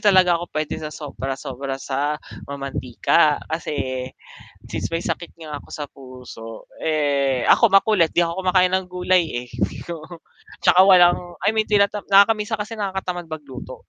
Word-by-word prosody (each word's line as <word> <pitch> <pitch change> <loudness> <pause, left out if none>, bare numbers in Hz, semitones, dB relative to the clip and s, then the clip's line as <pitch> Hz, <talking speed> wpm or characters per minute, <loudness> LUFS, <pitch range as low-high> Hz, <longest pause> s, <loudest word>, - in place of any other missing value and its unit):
talaga 180 -3 +5
ako 175 - -6
pwede 155 -1 -2
sa 155 - -5
sobra-sobra 135 -2 -5
sa 140 +2 -2 0.3
mantika 140 +2 +1
kasi, 130 -5 -3 0.6
since - - -4
may 165 +1 -3
sakit 170 - -4
nga 155 -3 -7
ako - - -18
sa 150 - -5
puso, 125 -4 -11 0.3
eh 140 -4 +1
ako 230 - +5
makulit 195 -3 +4
'di 175 +2 +2
ako 170 +3 -3
kumakain 185 0 +3
ng 185 -1 0
gulay 180 -1 +2 0.2
eh, - - -18 0.4
oo, 165 +1 -9 0.5
tsaka 185 - +6
walang 175 -2 +6 0.2
i 215 - +3
mean 220 -1 0
tinatama 205 0 +1
nakaka 200 +2 +7
minsan 215 0 -3
kasi 210 +2 -6
nakakatamad 190 -5 -4
mag 155 -2 -7
luto. 130 -1 -9
165 Hz, 155 wpm, -22 LUFS, 140-185 Hz, 0.6 s, nakaka